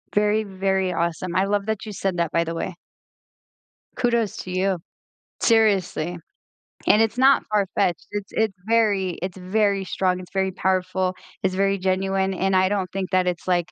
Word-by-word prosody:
Very, 210 +1 +3
very 190 -1 -1
awesome. 170 +1 -2
I 190 - +3
love 205 0 0
that 220 -1 -2
you 215 - -6
said 190 -2 -2
that, 170 -2 0
by 170 - +2
the 165 0 -4
way. 180 +2 -4 1.2
Kudos 235 -4 0
to 185 - -6
you, 185 +1 +1 0.6
seriously, 195 -7 +2 0.7
and 215 - +6
it's 225 +1 +1
not 270 +2 +5
farfetched, 190 -4 +1
it's 205 -1 -5
it's 220 -2 0
very 210 -5 +2
it's 185 +1 -4
very 200 +1 +1
strong, 185 -1 0
it's 180 - -11
very 190 -1 +1
powerful, 185 0 0 0.3
it's 185 -1 +1
very 195 +1 +2
genuine, 190 +1 0
and 190 +1 0
I 185 0 +4
don't 195 -3 -1
think 195 0 -3
that 185 -1 +2
it's, 175 0 -2
like, 175 -2 +1
190 Hz, 170 wpm, -23 LUFS, 185-205 Hz, 1.2 s, and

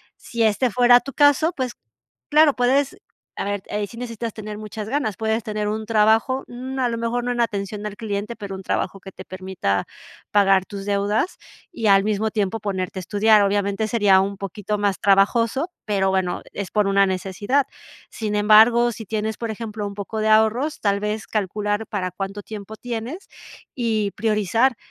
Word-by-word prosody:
Sí 235 -1 -3
este 220 +4 +2
fuera 245 +1 +6
tu 275 - -9
caso, 290 +3 +4
pues, 255 -5 -2 0.6
claro, 300 -1 +5
puedes, 270 +7 +2 0.4
a - - -2
ver, 205 -1 -3
eh, 210 0 -2
sí 230 - -12
necesitas 230 -2 -5
tener 215 -1 -7
muchas 215 0 -7
ganas, 260 -6 -1
puedes 220 0 -1
tener 215 -2 -3
un 215 +1 -2
trabajo, 225 +4 +3
mm, 260 +2 -6
a 250 - +2
lo 230 - -2
mejor 230 +1 -1
no 245 - -1
en 240 - 0
atención 205 -2 -2
al 210 -1 -5
cliente, 210 0 -4
pero 200 -3 -6
un 190 - -8
trabajo 195 - -2
que 195 0 -11
te - - -11
permita 185 - -2 0.5
pagar 195 -2 +4
tus 200 -1 -7
deudas 205 - 0 0.3
y 225 -10 -2
al 195 -1 +6
mismo 215 +1 0
tiempo 210 +1 -1
ponerte 190 -2 -3
a - - -5
estudiar. 210 +3 +4
Obviamente 200 +2 0
sería 205 -4 +4
un 195 0 -3
poquito 200 +2 -4
más 205 -2 0
trabajoso, 230 - +2
pero 195 -3 +1
bueno, 190 -2 0
es 200 -3 -5
por 210 -2 +2
una 195 0 +4
necesidad. 195 +8 0 0.4
Sin 210 -2 -3
embargo, 220 +3 +6
sí 220 0 -8
tienes, 220 +1 -2
por 230 -1 -3
ejemplo, 215 -1 -5
un 200 - -8
poco 205 +2 -5
de 215 0 +1
ahorros, 220 +7 +3
tal 200 -1 +1
vez 210 +1 -3
calcular 210 +1 -2
para 185 -4 -3
cuánto 195 +2 -5
tiempo 215 0 -8
tienes 245 - -6 0.5
y 220 -5 0
priorizar, 225 +3 +1
215 Hz, 185 wpm, -22 LUFS, 200-230 Hz, 0.6 s, fuera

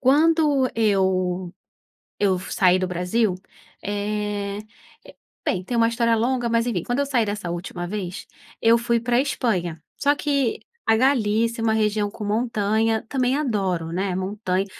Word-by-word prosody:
Quando 290 -1 +4
eu 190 -4 +1 0.7
eu 195 -3 +3
f 185 - -6
saí 185 -1 +4
do 185 - -1
Brasil, 180 +3 0 0.5
eh, 205 0 -2 0.9
bem, 185 0 0
tem 240 - -4
uma 230 0 +4
história 230 0 +2
longa, 240 +2 0
mas 230 0 +2
enfim, 185 -8 -1
quando 245 +3 -1
eu 285 - +2
saí 250 -5 +2
dessa 205 -3 -4
última 175 0 -5
vez 190 -2 -5 0.3
eu 230 +1 +5
fui 235 0 +1
pra 240 +1 +1
Espanha, 185 - -1 0.2
só 285 +1 +2
que 280 -5 0 0.3
a 225 - +4
Galícia 230 -3 +2
é - - -2
uma 220 -1 +2
região 210 -1 +1
com 215 - -8
montanha 220 0 0
também 255 -1 +1
adoro, 190 - -1
né, 190 +1 -1
montanha. 190 0 -1
215 Hz, 155 wpm, -23 LUFS, 190-240 Hz, 0.9 s, eu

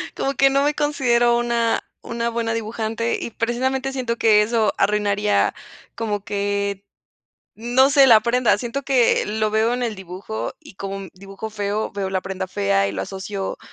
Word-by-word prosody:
como 275 - -1
que 275 0 +4
no 275 +1 +2
me 295 +1 +2
considero 240 -5 +2
una 235 -1 +1 0.2
una 235 0 -3
buena 230 -1 -2
dibujante 225 +1 -2
y - - -4
precisamente 260 +4 -1
siento 250 -3 -2
que 215 -2 +5
eso 220 0 +1
arruinaría 205 0 +1 0.4
como 210 -3 -3
que, 200 -1 -2 0.7
no 245 +4 +3
sé, 280 -1 +6
la 225 -3 +7
prenda? 240 +1 +2
Siento 250 +3 -4
que 260 -4 +3
lo 215 0 -1
veo 220 +2 +2
en 250 0 -2
el 230 -3 -2
dibujo 190 +3 -6
y 300 -10 -15
como 195 0 -5
un 195 -2 -7
dibujo 195 +3 -8
feo, 210 0 -2
veo 200 -1 -3
la 190 -1 -1
prenda 190 0 -4
fea 100 - +1
y 100 - -4
lo 95 - -3
asocio, 195 - -5
220 Hz, 175 wpm, -21 LUFS, 200-240 Hz, 0.7 s, la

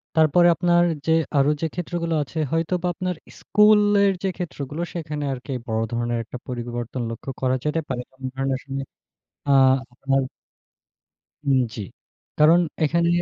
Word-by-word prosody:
তারপরে 160 +2 +5
আপনার 175 0 +3 0.2
যে, 160 - +1 0.3
আরো 140 +1 +4
যে, 165 - +1
ক্ষেত্রগুলো 170 -1 -3
আছে 160 - -11
হয়তোবা 170 +2 0
আপনার 180 +1 -3 0.2
স্কুলের 205 -1 +5
যে, - - +1
ক্ষেত্রগুলো 155 -3 -5
সেখানে 150 -3 -4
আরকি 130 +2 -7 0.2
বড় 110 0 0
ধরনের 120 0 -1
একটা 125 - -8
পরিবর্তন 120 0 -4
লক্ষ্য 115 +4 -6
করা 130 0 +2
যেতে 150 +2 +1
পারে। 125 -2 -3
সব 130 0 -27
ধরনের 135 0 -1
আসলে 135 0 -5 0.7
আ - - +4 1.9
উম 135 -2 +3
জ্বী। 105 - -5 0.6
কারণ 160 +3 +6 0.2
এখানে 170 +2 +2
150 Hz, 135 wpm, -23 LUFS, 130-175 Hz, 1.9 s, কারণ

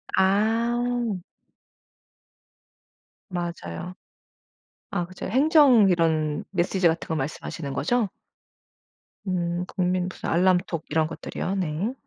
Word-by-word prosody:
아. 230 +3 +1 2.1
맞아요. 175 - -5 1.0
아 175 -5 -1
그죠. 185 +1 -8
행정 260 -4 +5
이런 160 -3 +1
메시지 185 0 +2
같은 165 +1 -1
거 160 - -1
말씀하시는 145 0 -4
거죠? 220 +6 +1 1.2
음. 175 -2 -1
국민 180 -1 0
무슨 - - -6
알람톡 175 -1 +2
이런 155 +1 +2
것들이요. 180 +4 -4
네. 185 +5 -1
180 Hz, 195 characters per minute, -25 LUFS, 165-210 Hz, 2.1 s, 행정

